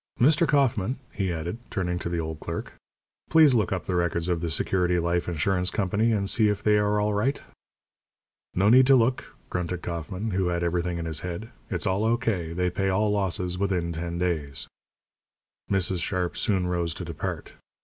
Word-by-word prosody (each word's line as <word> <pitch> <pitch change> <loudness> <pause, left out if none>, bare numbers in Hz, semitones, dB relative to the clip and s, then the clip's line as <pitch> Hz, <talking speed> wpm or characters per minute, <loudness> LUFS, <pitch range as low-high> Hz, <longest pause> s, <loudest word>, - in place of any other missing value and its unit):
Mr. 155 +6 +4
Kauffman," 130 -5 +2
he 95 -2 -2
added, 85 +6 -4
turning 90 -3 -2
to 85 - -4
the 85 - -2
old 80 -1 -4
clerk, 85 +1 -5 0.6
"please 155 -4 +6
look 110 -5 +2
up 95 -2 -2
the 95 - -2
records 85 -1 0
of 85 -2 0
the 85 - -2
Security 90 +3 +1
Life 85 0 0
Insurance 90 +3 0
Company 105 +3 +1
and 100 -3 0
see 110 +1 +3
if 105 0 -2
they 105 -1 +4
are 105 0 +2
all 105 0 +1
right." 130 +8 0 1.2
"No 100 +3 +4
need 130 +2 +7
to 135 - +7
look," 125 +1 +1 0.2
grunted 90 0 -3
Kauffman, 90 +6 -4
who 95 -1 0
had 85 0 -1
everything 85 0 -1
in 85 - -4
his 80 -3 -1
head. 90 +6 -6 0.2
"It's - - -2
all 95 +2 +1
O.K. 110 -7 0
They 90 +1 0
pay 95 +2 0
all 105 +2 +2
losses 90 -3 -1
within 90 -4 0
ten 85 +1 -4
days." 80 -6 -2 1.0
Mrs. 95 -2 +1
Sharp 90 -2 -1
soon 95 -5 0
rose 85 -2 -1
to - - -6
depart. - - -5
90 Hz, 185 wpm, -26 LUFS, 85-105 Hz, 1.2 s, need